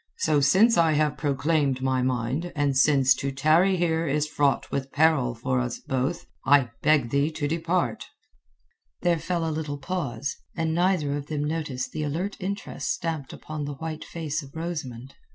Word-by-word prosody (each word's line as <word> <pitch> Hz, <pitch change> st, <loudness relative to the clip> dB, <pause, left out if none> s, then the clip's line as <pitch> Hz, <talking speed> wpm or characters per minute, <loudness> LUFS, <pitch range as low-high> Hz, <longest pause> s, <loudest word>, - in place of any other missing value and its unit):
So 155 Hz, -2 st, +2 dB
since 190 Hz, -, +5 dB
I 165 Hz, -2 st, +4 dB
have 150 Hz, 0 st, +1 dB
proclaimed 145 Hz, -2 st, 0 dB
my 130 Hz, -1 st, +1 dB
mind, 130 Hz, +7 st, -1 dB
and 145 Hz, -2 st, +1 dB
since 135 Hz, -1 st, +5 dB
to 135 Hz, +1 st, -2 dB
tarry 155 Hz, +7 st, +3 dB
here 165 Hz, -1 st, +1 dB
is 150 Hz, +2 st, +1 dB
fraught 145 Hz, -2 st, 0 dB
with 135 Hz, 0 st, -3 dB
peril 145 Hz, -6 st, +3 dB
for 130 Hz, +2 st, -1 dB
us 120 Hz, -1 st, -2 dB
both, 135 Hz, +6 st, -2 dB, 0.2 s
I 135 Hz, -3 st, +4 dB
beg 145 Hz, -6 st, +3 dB
thee 140 Hz, +2 st, +2 dB
to 155 Hz, -2 st, -3 dB
depart." 165 Hz, -5 st, -1 dB, 0.9 s
There 170 Hz, -2 st, +2 dB
fell 170 Hz, 0 st, -1 dB
a 160 Hz, -, -1 dB
little 150 Hz, -2 st, -3 dB
pause, 140 Hz, -5 st, -3 dB, 0.2 s
and 160 Hz, -1 st, -1 dB
neither 170 Hz, -5 st, +1 dB
of 145 Hz, 0 st, -5 dB
them 150 Hz, -2 st, -2 dB
noticed 150 Hz, -4 st, -3 dB
the 155 Hz, -, -4 dB
alert 165 Hz, +7 st, -2 dB
interest 200 Hz, +2 st, -4 dB
stamped 160 Hz, -5 st, -2 dB
upon 155 Hz, -2 st, -6 dB
the 145 Hz, 0 st, -5 dB
white 155 Hz, +2 st, -5 dB
face 160 Hz, -2 st, -4 dB
of 140 Hz, 0 st, -14 dB
Rosamund. 140 Hz, -7 st, -5 dB
150 Hz, 170 wpm, -26 LUFS, 135-165 Hz, 0.9 s, since